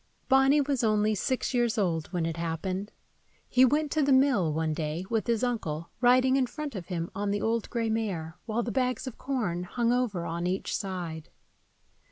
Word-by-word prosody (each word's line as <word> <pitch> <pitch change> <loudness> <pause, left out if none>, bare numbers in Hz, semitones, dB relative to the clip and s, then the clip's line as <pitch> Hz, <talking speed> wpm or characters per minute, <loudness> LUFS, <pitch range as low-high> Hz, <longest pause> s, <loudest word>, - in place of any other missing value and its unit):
BONNY 270 +2 +5
was 275 -3 0
only 215 -1 +3
six 255 +6 -1
years 240 -2 +1
old 165 -6 0
when 175 -3 -2
it 165 0 -3
happened. 185 +4 -3 0.6
He 255 - +4
went 295 +3 +3
to 315 - +1
the 280 -1 +2
mill, 260 - +4
one 160 0 0
day, 155 +3 -3
with 225 0 0
his 235 0 +1
uncle, 170 -10 -2
riding 255 +2 +5
in 260 -2 +2
front 300 +1 -6
of 190 -5 -6
him 170 -2 -3
on 205 0 -2
the 205 0 -1
old 225 0 0
gray 230 -2 -1
mare, 185 -8 -2
while 230 +2 0
the 235 - -3
bags 255 +2 0
of 260 - -7
corn 225 -11 -2
hung 235 +6 0
over 220 -9 0
on 170 +1 -2
each 185 +2 -2
side. 175 -5 -5
215 Hz, 195 wpm, -28 LUFS, 175-255 Hz, 0.6 s, BONNY